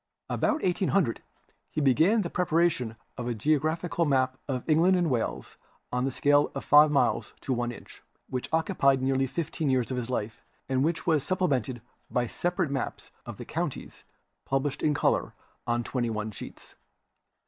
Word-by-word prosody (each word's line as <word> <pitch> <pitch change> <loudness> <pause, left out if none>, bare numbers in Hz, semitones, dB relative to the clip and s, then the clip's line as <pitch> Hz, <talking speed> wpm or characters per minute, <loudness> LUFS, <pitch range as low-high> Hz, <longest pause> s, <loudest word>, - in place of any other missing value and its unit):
About 310 0 0
1800 180 - +1 0.5
he - - -3
began 160 - +4
the 170 - -3
preparation 165 -9 +1 0.2
of 120 - -3
a 120 - -1
geological 155 - 0
map 130 -3 +1
of 130 -3 -3
England 170 +4 +4
and 175 -4 +1
Wales 120 -3 -2 0.3
on 125 +1 0
a - - +1
scale 145 +2 +3
of 135 - -5
five 150 +1 +7
miles 145 -2 +1
to 135 - -1
one 120 0 -1
inch, - - -13 0.3
which 125 -1 -4
occupied 150 -5 +2
nearly 135 0 +1
fifteen 160 0 -2
years 130 -1 +1
of 130 - -2
his 125 -1 -3
life 110 -3 -3 0.3
and 130 0 +1
which 165 +2 -1
was 155 -5 +2
supplemented 135 - -1 0.3
by 125 -1 0
separate 175 - -1
maps 135 - -4 0.2
of - - -7
the - - -8
counties - - -4 0.4
published 135 +1 -1
in 150 -1 +2
color - - +1 0.3
on 120 0 +1
twenty 120 -1 -2
one 110 -1 -3
sheets. - - -11
140 Hz, 165 wpm, -28 LUFS, 125-165 Hz, 0.5 s, five